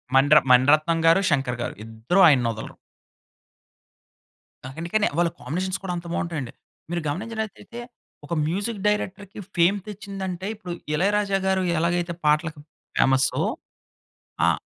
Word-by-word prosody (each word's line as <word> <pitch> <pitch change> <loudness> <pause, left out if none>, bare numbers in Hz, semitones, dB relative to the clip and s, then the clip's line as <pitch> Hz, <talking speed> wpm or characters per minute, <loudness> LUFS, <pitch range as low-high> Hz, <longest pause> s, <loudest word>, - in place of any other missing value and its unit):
మణిర 145 +3 +6
మణిరత్నం 150 +6 +5
గారు, 165 +4 +6
శంకర్ 135 -4 0
గారు - - -4
ఇద్దరూ 115 +11 -1
ఆయన్నొదలరు. 120 -7 +1 1.9
అ - - -5
అందుకనే 200 +6 +1
వాళ్ళ 170 0 +3
కాంబినేషన్ 185 +4 -3
కూడా 185 -2 -3
అంత 170 - -8
బావుంటాయండి. 155 -9 -3 0.4
మీరు 175 0 -2
గమనించినట్లయితే 220 +5 -5 0.5
ఒక 170 - -5
మ్యూజిక్ 200 +6 -2
డైరెక్టర్‌కి 205 -1 -2 0.2
ఫేమ్ 175 +3 +4
తెచ్చిందంటే 195 -2 -6
ఇప్పుడు 185 -5 -7 0.2
'ఇళయరాజా' 200 +3 +1
గారు 190 0 +2 0.2
ఎలాగైతే 170 +1 0
పాటలకు 155 +1 +1 0.4
ఫేమస్సో, 130 0 +3 1.0
ఆహ్ - - +2
175 Hz, 115 wpm, -24 LUFS, 150-195 Hz, 1.9 s, మణిర